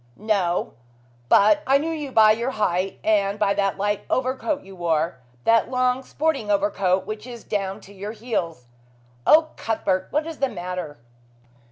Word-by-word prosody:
"No! 195 -5 0 0.6
But 215 +10 +5
I 270 +1 +5
knew 315 +3 -2
you 300 -4 -4
by 220 -3 +6
your 235 +4 0
height 195 -5 -1
and 205 -2 +2
by 205 -1 +2
the 200 -1 0
light 205 +1 -1
overcoat 260 +3 -1
you 195 - -12
wore. 165 -3 -1 0.2
That 230 0 +3
long, 255 0 +1
sporting 280 -5 -2
overcoat 195 -2 +1
which 215 +3 -6
is 240 -2 -9
down 195 0 -3
to 200 - -15
your 205 +2 -6
heels. 180 - -3 0.6
Oh, 315 0 +6
Cuthbert, 190 -4 -1
what 300 +2 0
is 325 -2 -7
the 275 -1 +1
matter?" 180 -6 -5
210 Hz, 160 wpm, -23 LUFS, 190-255 Hz, 0.6 s, by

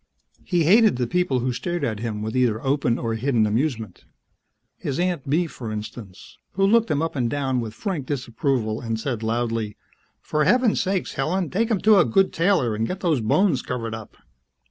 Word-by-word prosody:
He 175 -3 +1
hated 215 - +5
the 125 0 -1
people 135 -2 0
who 125 +1 -1
stared 175 +5 -3
at 110 -6 -1
him 110 -2 -4
with 110 +2 -4
either 120 -4 +2
open 135 -3 +1
or 115 -1 -2
hidden 115 -1 +1
amusement. 110 - -2 0.7
His 135 - -3
Aunt 175 -6 -1
Bee, 165 +5 +2
for 120 -8 -7
instance, 105 -2 -8
who 195 +1 +2
looked 230 +3 +3
him 150 +1 +1
up 165 - -3
and 120 -4 0
down 135 -2 -1
with 110 -2 -5
frank 160 - -4
disapproval 120 -4 -1
and 115 -2 -3
said 120 -2 -3
loudly, 115 -1 -2 0.4
"For 150 0 -1
Heavens 245 - +3
sake, 190 -1 -1
Helen! 170 +5 -1
Take 225 +5 0
him 215 -5 0
to 215 -2 +6
a - - +5
good 190 +12 +2
tailor 165 - +2
and 110 +2 -1
get 185 +1 -5
those 160 -8 +1
bones 135 - +2
covered 115 -3 -4
up!" 110 -1 -9
130 Hz, 190 wpm, -23 LUFS, 115-175 Hz, 0.7 s, to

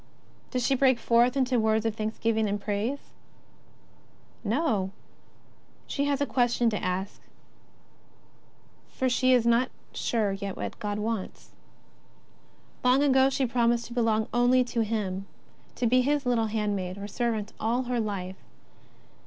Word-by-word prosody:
Does 250 -2 -1
she 275 - +3
break 260 -1 +4
forth 235 +3 +3
into 255 -2 +2
words 220 0 +1
of 225 - +1
thanks 220 0 -3
giving 220 -2 +1
and 205 +1 -1
praise? 215 +7 -3 1.3
Xo, 220 - 0 1.0
she 280 - -1
has 285 -1 0
a 285 - +1
question 240 -3 +1
to 210 - -3
ask, 185 +1 -3 1.7
for 260 - -1
she 255 +1 +2
is 245 -2 +4
not 235 +2 +3 0.2
sure 210 -4 0
jet 195 -1 -5
what - - -5
God 205 -1 -3
wants. 210 -2 -4 1.3
Long 255 +3 +4
ago 265 -1 +4
she 270 0 0
promised 235 -1 +1
to - - -8
belong 225 -2 +1
only 245 +1 +4
to 240 -1 -2
Him, 200 -3 -3 0.5
to 245 - -1
be 255 +2 +4
His 285 +1 0
little 235 -3 +1
hand 210 -1 -1
maid 185 -1 -4
or 200 0 -6
servant 220 -1 -2
all 235 +3 0
her 245 -1 -1
life. 190 -4 -4
230 Hz, 145 wpm, -27 LUFS, 210-250 Hz, 1.7 s, break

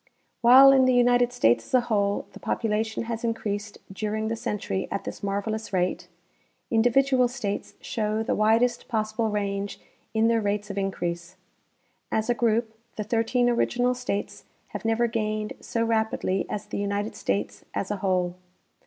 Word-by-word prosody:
While 260 +3 +9
in 265 -1 +5
the 255 -1 +3
United 245 0 +4
States 120 - +3
as - - -16
a 250 - +5
whole 205 -4 0
the - - -11
population 220 0 -1
has 230 0 -4
in 230 -1 0
creased 205 -1 -4 0.2
during 215 +2 -2
the 230 - -1
century 210 -3 -3
at 200 - -3
this - - -7
marvelous 205 +2 -3
rate, 180 -1 -1 0.6
individual 250 +3 +4
states 215 -5 -4
show 215 0 -1
the - - 0
widest 230 +3 +2
possible 220 -1 -1
range 200 -1 -2 0.4
in 220 +1 +4
their 230 -1 +2
rates 205 0 -2
of 200 - -8
increase. 175 -3 -3 0.8
As 220 +2 +1
a - - +4
group, 230 -1 +1 0.2
the 215 - -3
thirteen 230 +3 +1
original 245 +1 +2
states 245 -5 -4 0.2
have - - -7
never 225 +1 +2
gained 215 -2 -2
so 230 - -2
rapidly 220 -3 0
as 210 - -4
the - - -5
United 205 +1 -2
States 100 +1 -2
as 195 - -2
a 205 - -1
whole. 185 -2 0
220 Hz, 160 wpm, -26 LUFS, 200-235 Hz, 0.8 s, While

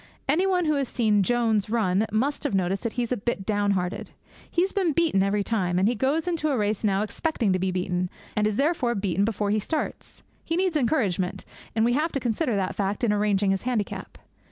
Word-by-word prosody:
Anybody 360 +3 +2
who 305 - +3
has 275 -2 0
seen 215 -4 +2
Jones 220 -1 +1
run 215 -2 +1
must 260 +7 0
have 285 -9 0
noticed 190 +1 0
that 230 -2 -3
he's 245 -1 -2
a 250 - +1
bit 200 -2 -3
downhearted. 200 -3 0 0.4
He 345 - +2
has 385 - -2
been 370 -6 +1
beaten 320 - +2
every 200 +1 +1
time, 185 -5 0
and 190 +2 +3
he 235 - +2
goes 275 - 0
into 325 -3 0
a 275 - +1
race 210 0 -1
now 200 -1 +2
expecting 225 - -1
to 185 - 0
be 190 +1 0
beaten, 180 0 -1 0.3
and 210 0 +2
is 215 - -1
therefore 275 -3 +1
beaten 195 -1 0
before 205 -2 -1
he 215 - +2
starts. 305 +9 -4 0.2
He 330 - -2
needs 365 -1 +1
encouragement, 220 - 0 0.3
and 220 0 +3
we 240 - +2
have 310 +5 +1
to 275 - 0
consider 240 0 0
that 190 -2 -1
fact 200 +3 -2
in 220 -3 +3
arranging 205 -1 +2
his 195 - 0
handicap. 240 -5 -3
220 Hz, 215 wpm, -25 LUFS, 195-275 Hz, 0.4 s, who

